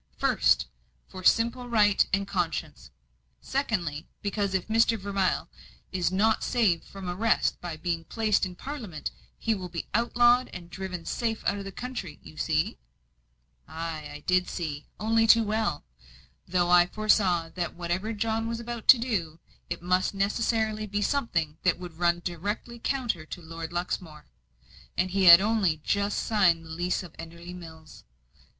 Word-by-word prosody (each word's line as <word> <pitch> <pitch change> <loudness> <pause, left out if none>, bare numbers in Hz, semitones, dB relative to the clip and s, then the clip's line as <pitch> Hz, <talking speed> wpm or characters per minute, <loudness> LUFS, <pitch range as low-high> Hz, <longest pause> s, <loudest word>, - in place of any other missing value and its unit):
First, - - +3 0.4
for 185 - -10
simple 235 +4 +2
right 210 -3 +4
and 195 +1 0
conscience; 175 -6 -3 0.5
secondly, 175 - -2 0.2
because 200 -1 -1
if 185 - -1
Mr. 225 +1 +3
Vermilye 195 -2 0 0.5
is 180 -1 0
not 215 +4 +2
saved 210 -10 +1
from 195 -2 -9
arrest 215 +6 +1
by 170 -3 -5
being 165 0 -2
placed 215 0 +1
in 185 -2 -2
Parliament, 225 - -6 0.3
he 225 - 0
will 185 -4 -5
be 170 -1 -5
outlawed 240 +2 +4
and 175 -2 -9
driven 185 -3 -6
safe 225 -2 -2
out 200 - +1
of 200 - -6
the 195 - -6
country. 220 -10 -6
You - - -13
see?" 155 - 0 0.9
Ay, 160 -2 -5
I 145 - -8
did, 180 0 +2 0.5
only 225 +1 +2
too 230 +1 +7
well. 215 - -1 0.6
Though 175 -1 +1
I 175 0 +7
foresaw 185 -5 +2
that 175 0 -4
whatever 175 +5 -2
John 225 +1 -1
was 230 0 -3
about 235 -1 -6
to 265 - +10
do, 190 -10 -2 0.3
it 170 0 -4
must 185 +2 +1
necessarily 215 +1 0
be 205 +1 -1
something 170 - -1
that 180 - +2
would 175 -2 -10
run 175 0 +2
directly 205 +7 -4
counter 240 - -1
to - - -7
Lord 165 -1 -7
Luxmore 175 -3 -4 0.7
and 185 +1 +1
he 195 0 +2
had 170 0 +11
only 205 -6 +2
just 200 0 0
signed 180 -7 +3
the - - -12
lease 175 +3 -1
of 175 - -11
Enderley 170 +2 -9
Mills. 160 -3 -12
190 Hz, 155 wpm, -27 LUFS, 170-220 Hz, 0.9 s, had